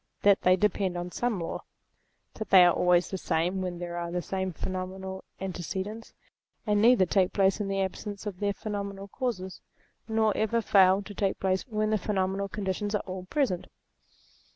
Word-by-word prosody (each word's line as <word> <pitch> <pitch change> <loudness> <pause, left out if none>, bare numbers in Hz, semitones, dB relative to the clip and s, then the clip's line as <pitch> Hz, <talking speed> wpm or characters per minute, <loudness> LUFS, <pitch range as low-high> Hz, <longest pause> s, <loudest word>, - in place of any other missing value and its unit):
that 200 -1 +5
they 180 0 +5
depend 190 -2 0
on 175 0 -4
some 240 -2 -1
law; 165 - -4 0.7
that 220 - -6
they 185 -2 +8
are 175 - +5
always 180 0 +3
the 190 - -3
same 175 +4 0
when 180 -2 -3
there 175 0 -5
are 170 0 -3
the 180 - -1
same 190 +1 -3
phenomenal 190 +2 -5 0.2
antecedents, 190 +4 -5 0.5
and 210 -1 +2
neither 230 -4 +6
take 185 +1 +2
place 195 0 +3
in 205 - -2
the 195 0 -1
absence 200 +2 -4
of 195 -3 -5
their 205 -1 +1
phenomenal 200 -1 -5
causes, 195 -5 -4 0.5
nor 220 -1 +2
ever 220 +2 +1
fail 195 -2 +5
to 205 - -9
take 195 -1 -1
place 190 +3 0
when 215 -2 0
the 215 - +2
phenomenal 195 -1 -1
conditions 205 +1 -2
are 210 - -1
all 185 -1 -6
present. 245 - -1
195 Hz, 175 wpm, -28 LUFS, 185-210 Hz, 0.7 s, they